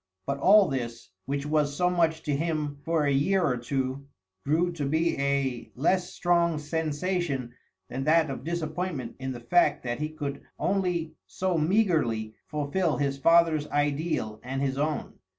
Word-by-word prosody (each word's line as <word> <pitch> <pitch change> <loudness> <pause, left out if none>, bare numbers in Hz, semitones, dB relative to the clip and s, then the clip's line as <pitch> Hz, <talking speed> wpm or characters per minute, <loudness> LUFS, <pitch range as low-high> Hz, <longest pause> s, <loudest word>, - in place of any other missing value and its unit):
But 140 0 -2
all 200 +5 +6
this, 115 -7 -4 0.2
which 140 +1 -2
was 150 -1 +1
so 180 - +3
much 165 -3 +1
to 145 - 0
him 150 -2 -2
for 165 -2 +1
a 140 - +2
year 180 +8 +2
or 140 -7 +2
two, 130 +2 -3 0.4
grew 165 +5 +1
to 165 -4 -4
be 160 +3 +1
a 140 -3 -1
less 180 +6 +1
strong 170 -2 +2
sensation 150 -3 -2 0.3
than 130 +5 -4
that 160 -1 +4
of 135 - -6
disappointment 160 -4 -3
in 130 0 -3
the 125 - -6
fact 175 +9 +3
that 120 0 -3
he 155 0 -2
could 145 -3 -5 0.2
only 180 -5 0
so 185 -1 -1
meagrely 155 - +1
fulfil 150 +3 0
his 140 -1 -1
father's 165 -1 +4
ideal 145 -7 -1
and 135 +2 -3
his 135 0 -1
own. 150 +1 -2
150 Hz, 160 wpm, -27 LUFS, 135-170 Hz, 0.4 s, all